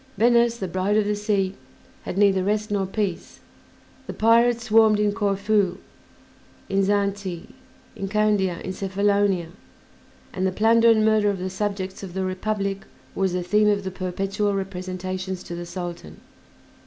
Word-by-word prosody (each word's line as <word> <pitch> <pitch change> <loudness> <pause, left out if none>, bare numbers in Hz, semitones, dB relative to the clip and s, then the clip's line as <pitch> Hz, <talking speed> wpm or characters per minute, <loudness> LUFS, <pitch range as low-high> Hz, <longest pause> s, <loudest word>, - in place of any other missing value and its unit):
Venice, 235 +1 +3
"The 190 - -4
Bride 185 +4 0
of 215 - +2
the 210 0 0
Sea," 205 -2 0 0.5
had - - -5
neither 195 -2 +4
rest 210 +2 -1
nor 195 -2 0
peace; 195 -3 -4 0.7
the - - -5
pirates 235 +1 +3
swarmed 220 -2 +4
in 210 0 +2
Corfu, 200 -1 0 0.9
in 195 0 +2
Zante, 200 -3 -1 0.4
in 195 - -4
Candia, 200 -3 +1
in 185 - -5
Cephalonia, 200 -2 0 0.8
and 185 0 0
the - - 0
plunder 230 +4 +4
and 220 -1 +4
murder 215 -1 +3
of 200 - -1
the 185 +1 -4
subjects 195 -1 -3
of 190 -2 -8
the 190 0 -1
Republic 195 +1 -2 0.3
was 190 -2 0
the 180 0 -1
theme 210 +4 +3
of 200 -1 +1
the 190 - -4
perpetual 195 +2 -2
representations 185 -1 -4
to - - -8
the 175 0 -6
Sultan. 175 - -7
195 Hz, 155 wpm, -23 LUFS, 185-210 Hz, 0.9 s, neither